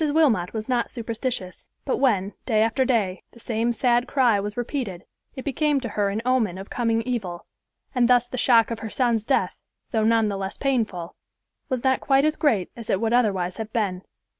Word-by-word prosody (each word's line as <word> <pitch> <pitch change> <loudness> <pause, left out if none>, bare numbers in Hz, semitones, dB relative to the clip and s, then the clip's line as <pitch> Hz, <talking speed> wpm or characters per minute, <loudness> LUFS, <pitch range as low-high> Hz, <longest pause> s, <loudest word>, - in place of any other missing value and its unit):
Wilmot 260 - +3
was 220 -1 -5
not 245 -2 0
superstitious; 230 -4 -4 0.2
but 265 - 0
when, 205 -7 +1
day 220 -3 +3
after 255 +4 +1
day, 205 -8 0
the 235 - -16
same 230 +1 -1
sad 245 +1 +2
cry 245 -7 +3
was 205 +2 -5
repeated, 240 - -4 0.3
it 260 - -7
became 295 0 +1
to 245 -3 -5
her 205 -1 0
an 210 +3 -3
omen 235 -8 +1
of 195 +1 -9
coming 230 -2 0
evil; 210 -8 -4 0.5
and 250 -3 +3
thus 245 -1 +4
the 250 - -6
shock 235 -2 +4
of 230 - -3
her 220 - -5
son's 235 -2 0
death, 275 - +1 0.3
though 220 -4 +1
none 225 0 +3
the 200 -1 -2
less 195 0 -4
painful, 220 -11 -1 0.6
was 255 -2 -2
not 265 -1 +2
quite 275 +1 +3
as 310 0 +2
great 240 - +1
as 230 -2 -10
it 190 - +2
would 225 +1 0
otherwise 195 -7 +1
have 220 -1 -5
been. 195 -6 -1
230 Hz, 200 wpm, -24 LUFS, 205-255 Hz, 0.6 s, thus